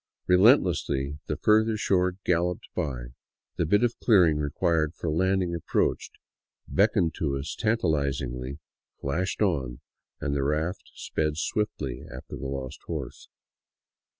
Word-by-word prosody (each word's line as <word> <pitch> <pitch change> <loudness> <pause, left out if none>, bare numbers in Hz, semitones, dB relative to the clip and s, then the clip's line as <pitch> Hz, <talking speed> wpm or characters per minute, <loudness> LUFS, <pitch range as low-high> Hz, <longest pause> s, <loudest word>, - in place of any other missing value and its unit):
Relentlessly 90 - +3
the 75 - -2
further 110 +3 +3
shore 90 -3 +1
galloped 90 0 0
by. 65 -8 -3 0.5
The 85 - +1
bit 105 +8 +3
of 120 -1 0
clearing 90 -9 +5
required 75 +2 0
for 80 - -3
land 95 +4 +2
ing 85 -1 -3
approached, 85 - -1 0.5
beckoned 95 -4 +2
to 70 -4 0
us 70 +2 -4
tantalizingly, 70 - -1 0.4
flashed 90 +9 -1
on, 70 -11 -1 0.4
and 70 - -2
the 70 - 0
raft 80 +6 -1
sped 75 -1 -2
swiftly 80 - -2
after 65 - -8
the 65 - -5
lost 65 -1 -5
horse. - - -6
80 Hz, 125 wpm, -27 LUFS, 70-95 Hz, 0.5 s, clearing